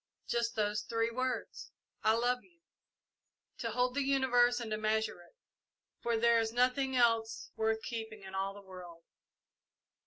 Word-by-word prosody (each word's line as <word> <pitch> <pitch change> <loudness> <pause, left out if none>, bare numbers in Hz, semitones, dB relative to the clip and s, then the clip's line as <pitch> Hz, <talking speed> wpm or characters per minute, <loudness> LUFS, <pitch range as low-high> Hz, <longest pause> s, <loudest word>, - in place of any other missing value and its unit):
Just 235 0 0
those 210 -1 0
three 230 0 -1
words, 255 +2 -3 0.3
'I 220 - +4
love 245 +2 +1
you,' 340 -2 -27 1.0
to - - -2
hold 250 0 +1
the 285 - 0
universe 250 -3 +3
and 230 -2 -5
to 215 - 0
measure 220 -3 0
it, 175 - -20 0.7
for 235 -1 +1
there 235 0 +4
is 225 -1 0
nothing 255 +2 +2
else 230 -2 +2
worth 220 0 0
keeping 220 -3 -5
in 190 0 -9
all 195 +1 -2
the 205 - -11
world!" 175 -3 -11
230 Hz, 155 wpm, -33 LUFS, 215-245 Hz, 1.0 s, I